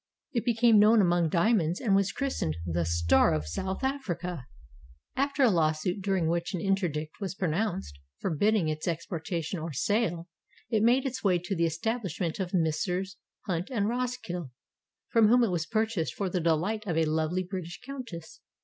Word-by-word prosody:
It 235 -3 -1
became 230 -2 +5
known 215 +2 +6
among 175 -3 +3
diamonds 175 -1 +2
and 205 -6 +2
was 195 0 +2
christened 260 - -2
the 85 0 -1
"Star 85 -1 +3
of 75 0 -2
South 190 - -4
Africa." 180 - -3 0.7
After 280 +1 +1
a 245 - +6
lawsuit, 165 +2 +1
during 190 -4 +1
which 170 +3 -1
an - - -2
interdict 165 -4 -1
was 190 -2 -3
pronounced 180 - -2 0.2
forbidding 195 +2 +1
its 155 +1 -3
expor 170 0 -3
tation 165 0 -3
or 160 -1 -5
sale, 175 - 0 0.4
it 220 -2 +2
made 245 +4 +4
its 260 -1 -3
way 185 -3 +4
to 180 +3 -3
the 170 -1 +2
establishment 180 -1 -2
of 185 -2 -2
Messrs. 180 +3 -1 0.2
Hunt 180 -3 -3
and 215 -6 0
Rosskill 235 - -3 0.6
from 225 -2 +5
whom 245 +2 +5
it 220 - +1
was 165 -3 -1
purchased 220 -6 -1
for 195 -3 -2
the 180 - 0
delight 170 +7 +1
of 165 -3 -1
a 165 - +3
lovely 160 +4 0
British 180 -2 -6
countess. 245 -12 -8
185 Hz, 170 wpm, -28 LUFS, 165-220 Hz, 0.7 s, known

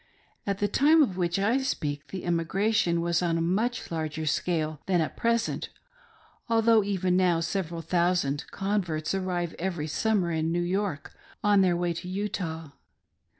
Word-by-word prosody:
At 200 -1 0
the 205 - +1
time 305 +7 +5
of 195 -10 -1
which 175 -1 0
I 220 +7 +2
speak, 145 - -3
the 185 -2 -6
emi 170 -1 +1
gration 195 -2 +1
was 170 0 +1
on 170 -2 +1
a - - 0
much 210 +9 -1
larger 160 -1 -3
scale 155 -1 -1
than 185 -2 +2
at 160 - -1
present; 230 0 0 0.8
although 225 -1 +4
even 185 -2 0
now 180 -2 +3
several 170 0 -3
thousand 170 -5 +1
converts 190 -6 -1
arrive 180 -3 -2
every 175 -4 -2
summer 185 +2 0
in 160 0 0
New 175 +1 0
York 185 -4 -2 0.3
on 205 -1 +5
their 180 -2 +3
way 175 -1 0
to 170 +2 -7
Utah. 180 -5 -4
180 Hz, 160 wpm, -27 LUFS, 165-200 Hz, 0.8 s, time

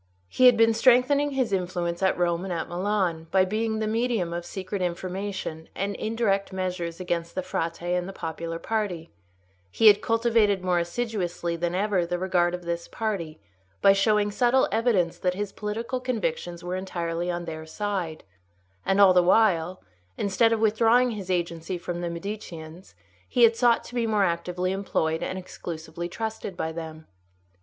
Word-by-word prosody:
He 255 - +5
had 245 -2 +6
been 225 0 +5
strengthening 255 +5 +4
his 260 -6 -1
influence 175 -2 -2
at 190 - +2
Rome 175 0 +1
and 190 - -5
at 165 -2 -2
Milan, 180 -3 -1
by 190 +1 +4
being 220 +3 -1
the 215 - -1
medium 220 -5 0
of 175 0 -5
secret 190 0 -5
information 180 -2 -4
and 200 +1 -2
indirect 215 -3 0
measures 180 -2 -3
against 170 -2 -3
the 185 - -2
Frate 165 -1 -3
and 180 +1 -1
the - - -5
popular 165 -2 -5
party; 185 -5 -3 0.6
he 225 - 0
had 210 -1 +8
cultivated 225 -4 +2
more 180 -1 +2
assiduously 175 -3 -2
than 175 +1 -2
ever 195 -2 +1
the 175 +1 -2
regard 180 -1 +1
of 180 - -9
this 170 0 -3
party, 195 -8 -3 0.4
by 195 0 +6
showing 205 +1 +2
subtle 245 +4 +3
evidence 220 -8 +1
that 180 -1 0
his 205 0 -3
political 225 +5 -3
convictions 175 -9 -3
were 180 +1 -3
entirely 175 -2 -3
on 175 0 -3
their 160 -1 -7
side; 185 -3 -3 0.6
and 195 +1 +1
all 195 -2 +8
the 180 - +6
while, 185 -2 +2 0.3
instead 205 +3 +2
of 225 - +1
withdrawing 225 +3 +4
his 200 -4 -6
agency 170 0 -2
from 175 0 -5
the 175 - -2
Mediceans, 170 - -7 0.3
he 245 - +3
had 230 0 +6
sought 235 0 +3
to - - -12
be 235 -2 0
more 210 -2 +2
actively 180 +1 -1
employed 160 -5 -1
and 190 - -3
exclusively 170 -2 -6
trusted 220 -2 -5
by 160 - -2
them. 160 -1 -7
185 Hz, 170 wpm, -26 LUFS, 170-215 Hz, 0.6 s, had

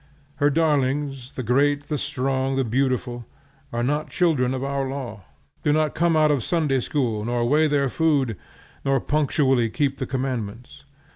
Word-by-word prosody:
Her 145 +1 +3
darlings, 140 -3 0
the 130 - -4
great, 140 +5 +2
the 150 - -1
strong, 135 +1 -1
the 135 - +1
beautiful, 125 0 -1 0.4
are 120 -1 -1
not 150 +4 -1
children 150 -9 +2
of 130 - -3
our 140 -1 -1
law; 120 -8 -6 0.4
do 150 - +2
not 155 0 +2
come 170 -1 +2
out 155 -1 +4
of 145 - +3
the - - -4
Sunday 150 -1 +1
School, 120 -5 -1
nor 120 +1 0
weigh 155 +4 +4
their 145 -2 +2
food, 140 -5 +1 0.5
nor 135 -1 +2
punctually 135 -4 +1
keep 140 +3 0
the - - -3
commandments. 125 -3 -4
135 Hz, 165 wpm, -23 LUFS, 125-145 Hz, 0.5 s, out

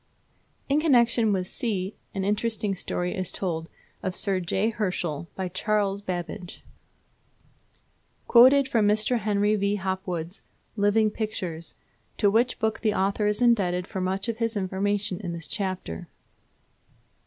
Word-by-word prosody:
In 280 +2 +3
connection 235 -6 +4
with 185 -2 0
(c) 195 -2 -2 0.2
an 195 - -1
interesting 210 0 0
story 180 0 -2
is 185 -3 -2
told 165 -4 -3 0.3
of 185 -1 -2
Sir 195 -3 +1
J. 190 +5 0
Herschel 175 -7 -2
by 190 -1 -2
Charles 200 +2 0
Babbage: 180 -1 -5 1.6
Quoted 260 +3 +7
from 225 -5 +2
Mr. 215 +3 +3
Henry 210 0 +2
V. 200 0 +1
Hopwood's 185 -2 -3 0.3
"Living 210 +1 +3
Pictures," 180 -7 -4 0.4
to 205 -3 +3
which 235 +4 +2
book 220 0 -1
the 215 -2 +1
author 200 +2 +1
is 210 +3 +1
indebted 185 -7 +3
for 190 - -5
much 190 +3 -1
of 230 -1 -2
his 230 -1 -1
information 195 0 -1
in 180 -5 -4
this 165 -2 -6
chapter. 185 - -4
200 Hz, 135 wpm, -26 LUFS, 185-220 Hz, 1.6 s, Quoted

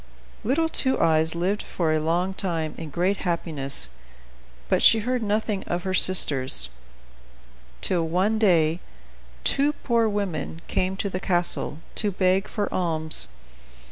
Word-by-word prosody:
Little 285 +9 +1
Two 265 -4 0
Eyes 160 0 +2
lived 185 +5 -1
for 160 -3 -1
a 155 - +1
long 175 +4 0
time 165 -5 -2
in 160 -2 -7
great 180 +6 0
happiness; 150 - -3 0.8
but - - +1
she 225 - +6
heard 250 +2 -1
nothing 210 -1 -1
of 175 0 -3
her 190 -1 -2
sisters, 135 - +4 1.1
till 170 -3 0
one 190 +6 +1
day 170 -5 +3 0.6
two 285 +2 +2
poor 230 -3 +2
women 180 -6 -4
came 185 +1 -1
to 200 - -2
the 185 - -3
castle, 175 -5 -1 0.2
to 210 - 0
beg 185 +1 +1
for 205 -2 -3
alms. 160 - +3
180 Hz, 140 wpm, -24 LUFS, 160-205 Hz, 1.1 s, she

